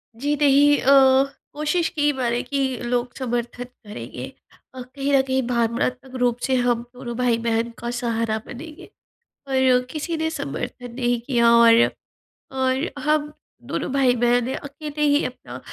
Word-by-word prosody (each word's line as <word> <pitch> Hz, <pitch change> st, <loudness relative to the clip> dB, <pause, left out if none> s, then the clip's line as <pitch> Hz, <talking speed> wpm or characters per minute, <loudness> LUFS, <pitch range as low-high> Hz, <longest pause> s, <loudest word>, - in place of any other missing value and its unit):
जी 290 Hz, +5 st, -1 dB
नहीं 290 Hz, +1 st, +5 dB
अ, 265 Hz, 0 st, +6 dB, 0.3 s
कोशिश 305 Hz, +3 st, 0 dB
की 295 Hz, -3 st, +1 dB
मैंने 245 Hz, -2 st, -1 dB
कि 270 Hz, -3 st, -1 dB
लोग 245 Hz, 0 st, -1 dB
समर्थन 245 Hz, -1 st, -3 dB
करेंगे 245 Hz, -4 st, -9 dB, 0.5 s
अ, 255 Hz, -, -6 dB
कहीं 275 Hz, +3 st, -3 dB
न 270 Hz, -, +6 dB
कहीं 265 Hz, 0 st, 0 dB
भावनात्मक 245 Hz, +2 st, -1 dB
रूप 245 Hz, -1 st, +2 dB
से 265 Hz, -, +2 dB
हम 245 Hz, -2 st, +1 dB
दोनों 240 Hz, -1 st, -7 dB
भाई-बहन 235 Hz, -1 st, 0 dB
का 235 Hz, -, -4 dB
सहारा 230 Hz, -2 st, -1 dB
बनेंगे। 305 Hz, +5 st, -10 dB, 0.6 s
और 260 Hz, -2 st, +3 dB
किसी 320 Hz, +2 st, -3 dB
ने 320 Hz, 0 st, -1 dB
समर्थन 245 Hz, -, -5 dB
नहीं 245 Hz, -2 st, 0 dB
किया 235 Hz, -2 st, +2 dB
और 235 Hz, 0 st, +6 dB, 0.7 s
और 260 Hz, +5 st, 0 dB
हम 300 Hz, 0 st, +1 dB, 0.4 s
दोनों -, -, -2 dB
भाई-बहन 245 Hz, -2 st, +3 dB
ने 260 Hz, -, -3 dB
अकेले 295 Hz, +1 st, -7 dB
ही 290 Hz, +1 st, +3 dB
अपना 130 Hz, -, -8 dB
255 Hz, 145 wpm, -22 LUFS, 240-280 Hz, 0.7 s, अ